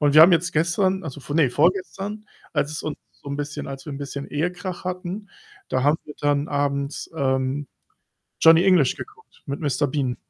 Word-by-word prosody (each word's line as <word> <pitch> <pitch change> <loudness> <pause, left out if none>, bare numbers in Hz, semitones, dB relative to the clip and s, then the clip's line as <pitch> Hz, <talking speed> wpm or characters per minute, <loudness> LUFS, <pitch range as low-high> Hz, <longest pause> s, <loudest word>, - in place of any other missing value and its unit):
Und 145 -1 +3
wir 155 - +10
haben 175 +3 +8
jetzt 175 +2 +2
gestern, 185 +4 +1
also 145 -2 -6
vor 145 +3 -4
ne, 145 -6 +4
vorgestern, 195 - 0 0.3
als 145 - 0
es 150 - -5
uns 155 - -3 0.2
so 145 - -12
'n 140 - -3
bisschen 145 0 -4
als 135 +2 -8
wir 150 - -5
'n 140 - -6
bisschen 140 0 -5
Ehekrach 180 +4 -3
hatten, 185 +3 -4 0.4
da 130 - 0
haben 145 +4 +3
wir 150 - -10
dann 145 0 +1
abends, 140 0 -1
ähm, 135 0 0 0.7
Johnny 165 +2 +7
English 180 -9 +4
geguckt 430 +1 -12
mit 140 -1 -4
Mister 145 -2 +1
Bean. 130 -3 -1
150 Hz, 190 wpm, -23 LUFS, 140-180 Hz, 0.7 s, wir